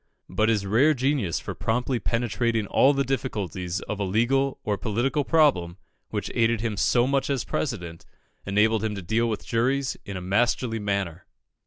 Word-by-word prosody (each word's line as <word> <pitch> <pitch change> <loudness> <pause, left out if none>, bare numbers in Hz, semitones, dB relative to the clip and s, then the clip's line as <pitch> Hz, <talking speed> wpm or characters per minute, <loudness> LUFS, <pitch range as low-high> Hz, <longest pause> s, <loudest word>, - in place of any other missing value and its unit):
But 110 +1 +1
his 105 -3 +1
rare 130 +10 +4
genius 130 - 0
for - - -6
promptly 125 +2 -1
penetrating 115 -1 0
all 135 +7 +4
the 140 -1 +1
difficulties 100 - -3
of 105 - -5
a - - 0
legal 120 +8 +1
or 105 - 0
political 120 +8 -1
problem, 130 - +2 0.3
which - - -3
aided 115 -1 +2
him 110 -2 -2
so 120 +4 +3
much 135 +1 0
as 135 -3 0
President, 85 - -4 0.4
enabled 105 +2 +2
him 110 -1 -1
to 100 - -6
deal 115 +5 +1
with 110 -2 -4
juries 130 +3 0
in 100 -1 -6
a - - -4
masterly 115 +4 0
manner. 100 -5 -3
115 Hz, 170 wpm, -25 LUFS, 100-130 Hz, 0.4 s, rare